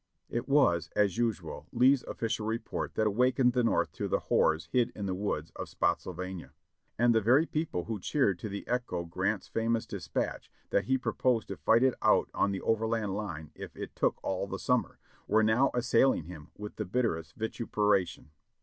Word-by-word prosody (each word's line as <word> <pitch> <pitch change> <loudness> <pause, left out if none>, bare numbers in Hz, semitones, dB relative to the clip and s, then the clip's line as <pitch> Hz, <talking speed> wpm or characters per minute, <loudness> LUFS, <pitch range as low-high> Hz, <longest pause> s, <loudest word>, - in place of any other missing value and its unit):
It 120 +3 -3
was, 85 - +3
as 105 +1 +2
usual, 115 -4 -2
Lee's 130 +1 +4
official 110 -1 -3
report 115 0 -3
that 110 - +1
awakened 125 +4 +3
the 125 -1 +2
North 115 - +1
to - - -4
the - - +1
horrors 80 +1 +1
hid 120 -2 +2
in 100 - -4
the 95 - -1
woods 90 -5 -3
of - - -6
Spottsylvania; 90 0 -2 0.4
and 120 +1 +4
the 110 - +3
very 130 +9 +4
people 155 - -2
who 110 +1 -4
cheered 100 - +1
to 110 - -5
the 100 0 -6
echo 120 -9 -2
Grant's 85 - -2
famous 115 0 0
dispatch, - - -4 0.2
that 100 - +2
he 130 +4 +2
proposed 125 -2 0
to 100 - -4
fight 115 - +3
it 130 -1 +4
out - - +3
on - - +2
the 95 - -3
overland 110 -2 0
line 80 -8 -5
if - - -9
it - - -7
took - - +1
all - - -2
the - - -4
summer, - - 0 0.3
were 110 +1 +4
now 110 +5 +4
assailing 120 -4 +3
him 80 -3 -10
with 105 0 -8
the 105 - -2
bitterest 90 -8 -1
vituperation. 105 -7 -1
110 Hz, 185 wpm, -30 LUFS, 95-120 Hz, 0.4 s, Lee's